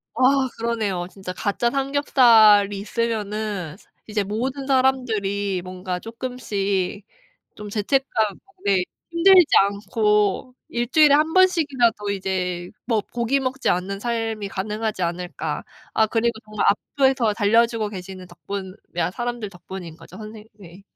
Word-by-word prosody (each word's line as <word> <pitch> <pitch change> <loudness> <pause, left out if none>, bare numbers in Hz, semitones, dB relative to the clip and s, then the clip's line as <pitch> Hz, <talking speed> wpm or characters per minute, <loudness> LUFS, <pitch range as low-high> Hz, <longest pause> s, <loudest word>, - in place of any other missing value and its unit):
아 - - -6 0.4
그러네요. 220 -6 -1
진짜 190 -2 -7
가짜 205 +5 0
삼겹살이 235 -7 +4
있으면은 210 -5 -3 0.3
이제 210 -1 -1
모든 255 +7 -3
사람들이 220 -8 +1
뭔가 185 0 -5
쪼끔씩 205 -5 -3 0.5
좀 210 0 -8
죄책감 220 -1 0 0.3
네 195 -2 +3 0.3
힘들지 360 +1 +6
않고 210 +3 +1
1 240 0 -2
주일에 300 0 +6
1 305 +2 +3
번씩이라도 285 - +2
이제 180 -2 -3 0.2
뭐 225 -3 +1
고기 240 +3 +1
먹지 265 0 -1
않는 190 +2 -1
삶이 225 -3 -2
가능하지 210 0 -3
않을까. 175 +1 -4 0.3
아 220 - +3
그리고 230 +2 +1
정말 215 -1 -2
앞을 265 +5 +2
더 230 -5 +1
달려주고 225 +1 +2
계시는 185 -1 -8
덕분에 190 0 -7 0.4
사람들 240 -3 -4
덕분인 175 -2 -9
거죠. - - -13
선생 215 0 -10
네. 190 -3 -14
215 Hz, 275 characters per minute, -22 LUFS, 195-240 Hz, 0.5 s, 힘들지